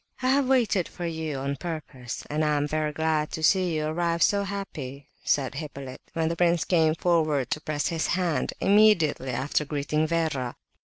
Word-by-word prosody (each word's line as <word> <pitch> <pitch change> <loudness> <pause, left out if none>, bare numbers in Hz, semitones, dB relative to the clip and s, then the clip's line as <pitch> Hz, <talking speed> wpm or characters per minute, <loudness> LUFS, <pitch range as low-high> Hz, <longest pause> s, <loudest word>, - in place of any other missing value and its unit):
"I 255 - +2
have 275 0 +3
waited 235 -9 +2
for 175 - -7
you 160 -3 -3
on 140 +1 -3
purpose, 140 -7 -6
and 150 +1 -1
am 150 -1 +1
very 155 0 -1
glad 155 0 0
to 160 - -4
see 180 -1 +3
you 155 0 -1
arrive 170 +1 0
so 200 -1 +3
happy," 155 -9 -6
said 135 -3 +1
Hippolyte, 140 -4 -7
when 165 -1 0
the 165 - -1
prince 170 -1 +2
came 160 -3 +3
forward 155 -7 +1
to 150 - -1
press 150 -1 -1
his 165 -1 -1
hand, 175 -3 0
immediately 195 -10 +4
after 130 +5 0
greeting 150 +1 -1
Vera. 155 -7 -1
155 Hz, 175 wpm, -26 LUFS, 145-175 Hz, -, immediately